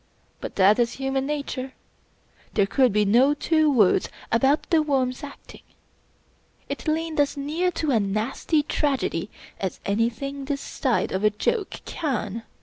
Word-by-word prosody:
But - - -7
that 200 +4 +5
is 235 0 +2
human 270 0 -2
nature. 280 -3 -4 0.8
There 200 - +4
could 255 +4 +3
be 210 +1 +2
no 250 +8 +4
two 310 0 +2
words 215 -8 +3 0.2
about 270 +6 +2
The 325 -2 +5
Worm's 265 -2 0
acting. 280 -1 -11 1.1
It - - -6
leaned 315 0 -1
as 285 0 +2
near 310 +6 0
to 310 -3 -1
a 235 - +3
nasty 215 +9 0
tragedy 270 - -1 0.3
as 190 -2 -3
anything 235 +7 -1
this 280 0 -2
side 260 -3 -1
of 190 +2 -2
a 215 - +6
joke 390 - -2
can. 230 - -3
270 Hz, 145 wpm, -24 LUFS, 220-295 Hz, 1.1 s, a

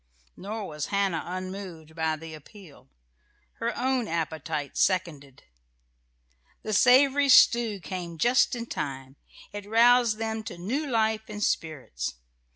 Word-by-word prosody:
Nor 210 +2 -6
was 150 -1 -5
Hannah 195 -5 0
unmoved 185 -3 -7
by 160 -1 -1
the 160 +1 -10
appeal. 155 - -15 0.7
Her 235 +1 -2
own 255 -2 0
appetite 160 -3 -3
seconded. 150 -8 -1 1.2
The 215 - -3
savoury 270 +5 +5
stew 235 -5 +5
came 175 -2 -6
just 245 - +3
in 235 -1 -5
time. 135 - -6 0.4
It 205 -1 -7
aroused 235 0 +4
them 220 0 -3
to - - -7
new 255 - -3
life 220 -3 0
and 210 0 -4
spirits. 135 - -3
195 Hz, 125 wpm, -27 LUFS, 160-230 Hz, 1.2 s, savoury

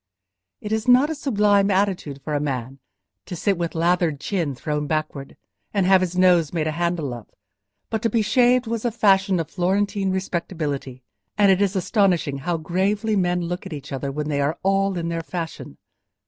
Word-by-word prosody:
It 210 - -6
is 220 +2 -1
not 255 +5 +5
a - - 0
sublime 210 -8 +2
attitude 185 -8 -1
for 150 - -4
a 145 - +1
man, 135 -2 -4 0.5
to - - -5
sit 195 +4 +1
with 170 -1 -3
lathered 170 -3 +1
chin 165 -6 -2
thrown 150 +2 -3
backward, 155 -3 -3 0.4
and 195 -2 +2
have 190 0 +5
his 180 -1 -2
nose 180 -4 +4
made 160 -3 -1
a 155 - 0
handle 170 -4 -2
of; 120 -3 -9 0.6
but 220 - -1
to 230 - +1
be 225 0 +1
shaved 245 +3 +3
was 230 -1 -3
a 240 - +1
fashion 195 -4 +3
of 165 - -4
Florentine 195 +2 0
respectability, 160 -8 -3 0.3
and 200 -2 +5
it 190 +1 +2
is 200 0 +1
astonishing 180 - +1
how 170 +4 -1
gravely 195 +7 0
men 180 -2 +1
look 175 +3 -4
at 185 - -7
each 145 -1 -8
other 135 0 -3
when 150 +2 -4
they 145 -2 0
are 150 +4 0
all 195 0 +1
in 170 -1 -3
the 165 0 -2
fashion. 165 - -6
180 Hz, 190 wpm, -23 LUFS, 155-200 Hz, 0.6 s, not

